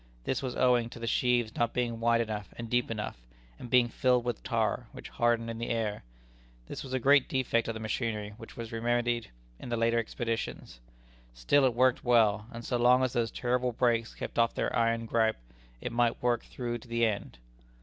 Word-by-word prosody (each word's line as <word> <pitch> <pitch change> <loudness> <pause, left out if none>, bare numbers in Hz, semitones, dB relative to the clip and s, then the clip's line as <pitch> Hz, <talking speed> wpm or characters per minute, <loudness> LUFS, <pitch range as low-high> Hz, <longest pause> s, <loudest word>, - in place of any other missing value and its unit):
This 130 - -1
was 130 -2 -4
owing 125 -2 +3
to 120 - -10
the 115 - -4
sheaves 120 -1 +1
not 120 -1 0
being 120 -2 -1
wide 115 0 +3
enough 105 -2 -4
and 115 - -5
deep 125 0 +1
enough, 105 - -4 0.4
and 125 - -8
being 125 -1 +5
filled 125 0 +1
with 120 -2 -2
tar, - - -1
which - - -9
hardened 120 -1 +1
in 115 - -7
the 115 - -3
air. 110 -3 -2 0.6
This - - -6
was 130 -1 -7
a 130 - +1
great 140 +2 +4
defect 125 -3 +1
of 115 - -3
the - - -5
machinery 110 -1 -3
which 115 -2 -12
was 115 -1 -6
remedied 120 0 0 0.3
in - - -8
the 120 - -1
later 115 +1 +2
expeditions. 115 - -4 0.6
Still 130 - +3
it 125 -3 +1
worked 130 0 +3
well, 110 -4 +3
and 115 -1 -8
so 125 - 0
long 125 +2 +5
as 130 - 0
those 115 -1 +1
terrible 125 0 -1
brakes 115 -1 +1
kept - - -5
off 115 0 +3
their - - -1
iron 115 0 +1
gripe, 110 -1 +1 0.4
it - - -4
might 120 0 +1
work 120 -1 +1
through 120 -1 -4
to 120 - -16
the 115 0 +1
end. 100 - -3
115 Hz, 205 wpm, -30 LUFS, 115-125 Hz, 0.6 s, being